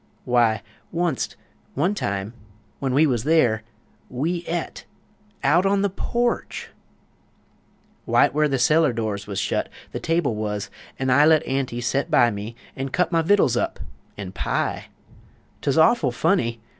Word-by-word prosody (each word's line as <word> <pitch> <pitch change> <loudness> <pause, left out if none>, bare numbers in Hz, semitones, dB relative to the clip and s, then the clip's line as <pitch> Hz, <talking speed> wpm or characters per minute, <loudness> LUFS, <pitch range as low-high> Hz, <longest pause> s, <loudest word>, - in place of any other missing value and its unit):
W'y, 120 -3 +2 0.3
wunst, 170 -5 -1 0.4
one 175 +9 +1
time, 100 - -3 0.5
when 135 -2 -1
we 145 +5 +4
wuz 130 -5 +2
there, 125 -8 +3 0.5
We 165 +7 -2
et 170 0 -4 0.6
out 165 +6 +4
on 195 0 +2
the 200 - +1
porch! 240 +5 -2 1.4
Wite - - +4
where 150 0 +3
the 135 -2 0
cellar 150 +2 +3
door 110 -3 -2
wuz 100 - -5
shut - - -1 0.2
The - - -4
table 165 -6 0
wuz; 105 -1 -3 0.3
an' 130 -1 0
I 140 +4 +6
Let 160 -1 +4
Aunty 130 -3 -2
set 120 +3 -1
by 120 -1 +4
me 105 +3 -6 0.2
an' 135 0 -3
cut 180 +7 0
My 165 -1 +3
vittuls 165 - +3
up 120 - -1 0.4
an' 100 -3 -6
pie. - - -2 0.8
'Tuz - - 0
awful - - +4
funny! 115 0 +1
135 Hz, 145 wpm, -23 LUFS, 115-165 Hz, 1.4 s, I